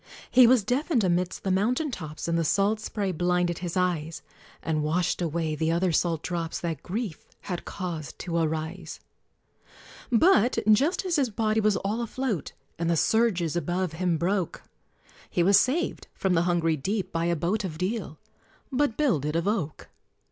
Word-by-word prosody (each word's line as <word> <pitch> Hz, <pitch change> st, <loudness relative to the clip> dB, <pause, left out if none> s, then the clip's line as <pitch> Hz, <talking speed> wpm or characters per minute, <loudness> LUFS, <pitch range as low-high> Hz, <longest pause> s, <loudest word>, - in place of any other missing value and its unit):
He 250 Hz, -1 st, +8 dB
was 245 Hz, -3 st, +5 dB
deafened 255 Hz, -, +1 dB
amidst 180 Hz, 0 st, 0 dB
the 190 Hz, -, 0 dB
mountain 245 Hz, +10 st, +1 dB
tops, 155 Hz, -8 st, -6 dB
And 170 Hz, -, +1 dB
the 165 Hz, -, +1 dB
salt 200 Hz, +6 st, +2 dB
spray 205 Hz, -3 st, -2 dB
blinded 175 Hz, 0 st, 0 dB
his 175 Hz, 0 st, -4 dB
eyes, 165 Hz, -3 st, -1 dB, 0.4 s
And 155 Hz, -1 st, 0 dB
washed 165 Hz, +4 st, 0 dB
away 165 Hz, -1 st, -1 dB
the 160 Hz, +2 st, 0 dB
other 175 Hz, +2 st, +1 dB
salt 165 Hz, -1 st, 0 dB
drops 170 Hz, -2 st, -3 dB
That 165 Hz, -5 st, -3 dB
grief 200 Hz, -3 st, -5 dB
had 180 Hz, -3 st, -5 dB
caused 165 Hz, -7 st, -5 dB
to 170 Hz, -1 st, -4 dB
arise: 160 Hz, +2 st, -3 dB, 1.1 s
But 245 Hz, -, +4 dB
just 290 Hz, -, +3 dB
as 350 Hz, -3 st, +1 dB
his 270 Hz, -4 st, +2 dB
body 215 Hz, 0 st, 0 dB
was 210 Hz, -1 st, +2 dB
all 210 Hz, +4 st, -2 dB
afloat, 235 Hz, -, -3 dB, 0.3 s
And 170 Hz, 0 st, 0 dB
the 170 Hz, -, +2 dB
surges 185 Hz, -6 st, +2 dB
above 175 Hz, 0 st, -1 dB
him 175 Hz, 0 st, 0 dB
broke, 185 Hz, +1 st, -1 dB, 0.7 s
He 175 Hz, -, +1 dB
was 200 Hz, +2 st, +6 dB
saved 290 Hz, +10 st, -1 dB
from 190 Hz, -2 st, 0 dB
the 165 Hz, -, +3 dB
hungry 165 Hz, -2 st, +1 dB
deep 195 Hz, +8 st, -2 dB
by 165 Hz, 0 st, -1 dB
a 170 Hz, 0 st, +1 dB
boat 180 Hz, +7 st, -1 dB
Of 165 Hz, -5 st, -5 dB
Deal 185 Hz, -3 st, -3 dB, 0.5 s
(but 265 Hz, -3 st, +1 dB
builded 155 Hz, -, +1 dB
of 170 Hz, +3 st, 0 dB
oak). 185 Hz, -9 st, -2 dB
180 Hz, 170 wpm, -27 LUFS, 165-215 Hz, 1.1 s, He